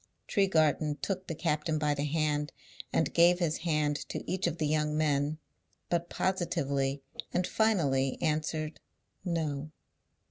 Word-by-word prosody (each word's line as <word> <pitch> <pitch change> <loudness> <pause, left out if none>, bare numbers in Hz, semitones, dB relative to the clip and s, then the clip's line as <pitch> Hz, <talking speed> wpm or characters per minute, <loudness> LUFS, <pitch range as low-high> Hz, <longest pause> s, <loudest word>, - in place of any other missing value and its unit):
Tregarthen 155 -6 +2
took 190 -1 -3
the 165 - -3
captain 155 -1 0
by 150 -1 +1
the 145 0 -1
hand, 150 0 0 0.4
and 160 - +1
gave 175 +1 +6
his 170 -3 0
hand 150 -3 +1
to - - -5
each 185 +1 0
of 170 -1 -2
the 155 - 0
young 150 0 +1
men, 150 0 +1 0.5
but 170 0 0
positively 140 -7 0 0.3
and 180 - +2
finally 145 -14 +2
answered 155 0 -1 0.4
No. 155 -5 -2
155 Hz, 135 wpm, -31 LUFS, 150-170 Hz, 0.5 s, gave